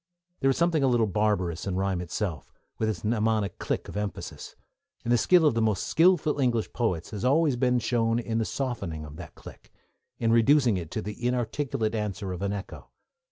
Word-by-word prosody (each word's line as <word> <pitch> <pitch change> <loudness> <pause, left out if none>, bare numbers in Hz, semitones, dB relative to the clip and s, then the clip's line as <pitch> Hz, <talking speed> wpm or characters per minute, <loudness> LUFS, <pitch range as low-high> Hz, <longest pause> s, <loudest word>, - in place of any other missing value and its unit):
There 135 - +2
is 135 - +1
something 170 -2 +2
a 135 - +3
little 120 -3 +3
barbarous 100 -4 0
in 95 - -1
rhyme 95 -1 0
itself, 90 -1 -4 0.3
with 110 - +1
its 105 -5 -4
mnemonic 110 -3 0
click - - -2
of - - -9
emphasis, 105 -3 -5 0.5
and 120 - +1
the - - +6
skill 175 +6 +5
of 150 - +4
the 115 - 0
most 110 -4 +1
skilful 165 -3 +3
English 120 -4 0
poets 90 -9 -1
has 105 -3 -5
always 145 +2 +3
been 125 0 +2
shown 115 -1 +1
in 115 -1 -1
the - - +1
softening 100 - -3
of 75 +1 -10
that 80 -4 -10
click, - - -13 0.5
in 115 -1 +1
reducing 120 0 +4
it 85 -4 -4
to - - -4
the 105 +5 -4
inarticulate 120 -2 -1
answer 100 -3 -3
of 90 - -6
an 100 0 -1
echo. 100 -1 -7
110 Hz, 200 wpm, -27 LUFS, 100-125 Hz, 0.5 s, the